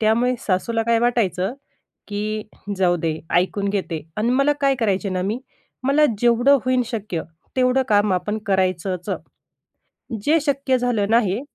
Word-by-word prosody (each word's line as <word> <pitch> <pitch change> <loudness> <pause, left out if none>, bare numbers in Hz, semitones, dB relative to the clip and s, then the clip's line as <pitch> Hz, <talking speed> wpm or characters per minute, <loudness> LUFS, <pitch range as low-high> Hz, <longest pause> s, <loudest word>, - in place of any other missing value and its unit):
त्यामुळे 235 +3 +2
सासूला 225 +4 0
काय 230 0 +2
वाटायचं, 230 -4 +1 0.5
की 210 +1 -3 0.3
"जाऊ 180 -2 +3
दे 160 -1 -2 0.2
ऐकून 200 +2 0
घेते" 185 -5 -2 0.2
अन् 220 +3 +1
मला 275 +2 +3
काय 275 -1 +3
करायचे 200 -3 0
ना 185 -1 -1
मी, 210 +6 -2 0.4
मला 280 +3 +4
जेवढं 245 +4 +4
होईन 255 -1 +2
शक्य, 210 -8 -4 0.3
तेवढं 255 0 +3
काम 205 -2 +3
आपण 210 +4 -1
करायचंच. 185 -2 0 1.1
जे 315 +6 +4
शक्य 275 -3 +1
झालं 225 -5 0
नाही 225 -2 +2
215 Hz, 140 wpm, -22 LUFS, 190-250 Hz, 1.1 s, मला